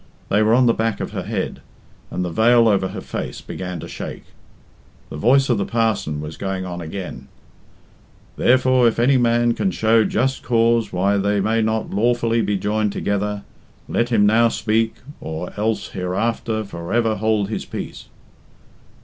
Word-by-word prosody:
They 105 - +3
were 110 +2 +4
on 125 0 +4
the 115 - +4
back 115 -1 -1
of - - -4
her - - -3
head, - - -4 0.5
and 90 - -2
the 90 - -4
veil 115 +5 +4
over 100 -3 +2
her - - -7
face - - -5
began 90 -2 -6
to - - -7
shake. - - -7 0.9
The - - -6
voice 130 - +3
of 120 -5 +1
the - - +1
parson 110 -10 -1
was 75 +1 -7
going 95 -1 -3
on 90 -1 -5
again 90 +3 -7 1.1
"Therefore 130 -1 +4
if 115 - 0
any 130 +3 +4
man 120 -1 +2
can 195 - 0
show 110 -8 +3
just 130 +5 0
cause 115 -1 +2
why 100 +3 +1
they 100 +1 +1
may 110 +3 +1
not 110 0 -1
lawfully 115 +2 +1
be 105 -2 0
joined 105 +1 0
together, 100 0 -2 0.4
let 120 +1 0
him 110 -4 +3
now 115 +3 +5
speak, 110 0 0 0.2
or 80 +3 -6
else 110 +1 -1
hereafter 110 +4 -2
for 85 -3 -8
ever 115 -1 +1
hold 105 -1 0
his 110 - -4
peace." - - -7
110 Hz, 170 wpm, -21 LUFS, 100-115 Hz, 1.1 s, now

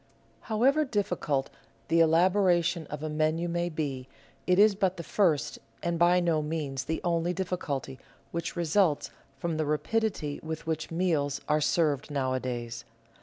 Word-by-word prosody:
However 265 +8 +3
difficult 180 - -1 0.4
the 165 0 +3
elaboration 175 0 +3
of 150 0 -6
a - - -1
menu 155 +2 0
may 175 0 -1
be, 140 -5 -4 0.4
it 180 0 +4
is 210 +1 +6
but 190 -2 0
the 170 - -5
first 165 -4 +1 0.2
and 170 -1 -1
by 175 +1 +5
no 170 -3 +1
means 150 -4 -3
the 160 +2 -2
only 170 0 +1
difficulty 155 -8 -3 0.3
which 170 0 -3
results 170 -2 +1 0.3
from 165 +3 -2
the 155 - 0
rapidity 150 0 -1
with 160 0 -5
which 160 -1 -2
meals 160 -5 0
are 150 0 +2
served 150 -2 +1
nowadays. 130 -4 -2
165 Hz, 145 wpm, -28 LUFS, 150-180 Hz, 0.4 s, is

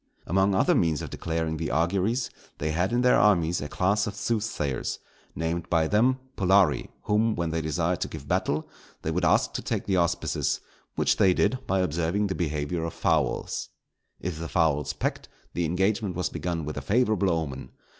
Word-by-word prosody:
Among 95 +3 +2
other - - +4
means 80 -4 +1
of - - -7
declaring 80 -1 -2
the 80 - -2
auguries, 95 - +1 0.3
they 75 +1 -1
had 90 +6 0
in 120 +1 +2
their 125 0 +5
armies 85 -5 +3
a 75 - -5
class 105 +4 +1
of 100 - -4
soothsayers, 105 - -2 0.4
named 80 +1 -2
by 80 -2 +3
them 120 +8 +3 0.2
pullarii, 95 -7 +3
whom, 110 +1 +2
when 85 -2 -1
they 80 0 -1
desired 80 +3 -1
to - - 0
give 70 - -9
battle, 75 +2 0 0.4
they - - -1
would - - -1
ask - - +3
to - - -3
take - - -2
the 95 -2 +1
auspices, 85 -1 0 0.4
which - - +2
they 90 -1 +4
did 130 - +2
by 95 0 +2
observing 85 +4 0
the 95 - -1
behaviour 80 -1 -2
of 85 - -4
fowls. - - 0 0.5
If 85 -3 -4
the 85 - -5
fowls 75 -5 +1
pecked, - - -3 0.2
the 85 - 0
engagement 95 +3 0
was 90 - -1
begun 85 -3 -3
with 75 -1 -5
a - - -2
favourable 105 - +2
omen. 70 -7 -2
85 Hz, 185 wpm, -27 LUFS, 80-100 Hz, 0.5 s, their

